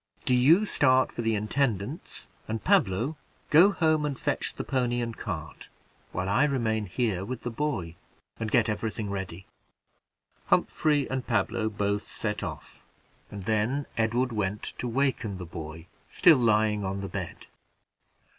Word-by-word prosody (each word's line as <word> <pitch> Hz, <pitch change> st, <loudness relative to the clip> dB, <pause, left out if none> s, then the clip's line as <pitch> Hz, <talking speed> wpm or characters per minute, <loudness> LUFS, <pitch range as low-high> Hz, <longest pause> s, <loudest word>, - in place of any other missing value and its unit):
Do 130 Hz, -, +2 dB
you 155 Hz, +12 st, +5 dB
start 130 Hz, -8 st, +3 dB
for -, -, -4 dB
the 115 Hz, -1 st, +1 dB
intendant's; 110 Hz, -, -2 dB, 0.2 s
and, 110 Hz, 0 st, -3 dB
Pablo, 145 Hz, -, +2 dB, 0.3 s
go 165 Hz, +6 st, +8 dB
home 155 Hz, -5 st, +2 dB
and 145 Hz, -3 st, -2 dB
fetch -, -, -1 dB
the -, -, -4 dB
pony 125 Hz, -2 st, 0 dB
and 115 Hz, -1 st, -3 dB
cart, 80 Hz, -6 st, -6 dB, 0.4 s
while 95 Hz, -, -2 dB
I 105 Hz, +9 st, +3 dB
remain 110 Hz, -7 st, 0 dB
here 95 Hz, -1 st, -1 dB
with 125 Hz, +4 st, -6 dB
the 120 Hz, -, -3 dB
boy, 115 Hz, -, -2 dB, 0.5 s
and 110 Hz, -1 st, -2 dB
get 120 Hz, 0 st, +3 dB
every 110 Hz, +1 st, -1 dB
thing 105 Hz, -2 st, -5 dB
ready." 95 Hz, -2 st, -5 dB, 1.0 s
Humphrey 150 Hz, -3 st, +2 dB
and 130 Hz, -1 st, -3 dB
Pablo 110 Hz, 0 st, 0 dB
both 100 Hz, -1 st, -1 dB
set 105 Hz, -1 st, -4 dB
off, 80 Hz, -7 st, -7 dB, 0.5 s
and 100 Hz, -2 st, -7 dB
then 110 Hz, +7 st, 0 dB
Edward 120 Hz, +3 st, +1 dB
went 105 Hz, -1 st, -2 dB, 0.2 s
to 125 Hz, -, -2 dB
waken 120 Hz, -5 st, 0 dB
the 90 Hz, -, -6 dB
boy, 80 Hz, 0 st, -8 dB, 0.2 s
still 165 Hz, -5 st, +6 dB
lying 105 Hz, -2 st, +2 dB
on 95 Hz, +1 st, -3 dB
the 100 Hz, -, -4 dB
bed. 95 Hz, -3 st, -6 dB
110 Hz, 155 wpm, -28 LUFS, 100-130 Hz, 1.0 s, go